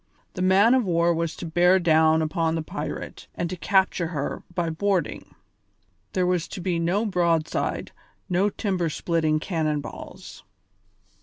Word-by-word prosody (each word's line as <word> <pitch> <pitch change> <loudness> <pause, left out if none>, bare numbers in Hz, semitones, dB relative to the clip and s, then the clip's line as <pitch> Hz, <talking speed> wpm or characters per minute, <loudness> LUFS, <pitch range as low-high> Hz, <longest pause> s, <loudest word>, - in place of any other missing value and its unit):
The 185 - -5
man 195 +6 +5
of 260 -1 +3
war 170 -2 +2
was 165 -1 -2
to - - -7
bear 175 +3 +4
down 160 -2 +4
upon 160 +1 0
the 165 - -2
pirate - - -6
and 170 - -2
to - - -2
capture 190 -2 +1
her 150 -4 -4
by 170 -2 0
boarding. 190 +2 -2 0.8
There 185 -1 +1
was 180 -2 0
to 200 - -7
be 175 -1 -1
no 180 +6 +1
broadside, 170 -5 0 0.4
no 185 +2 +2
timber 185 -5 -1
splitting 155 -1 0
cannon 155 -3 -1
balls. 140 - -10
170 Hz, 150 wpm, -25 LUFS, 160-185 Hz, 0.8 s, man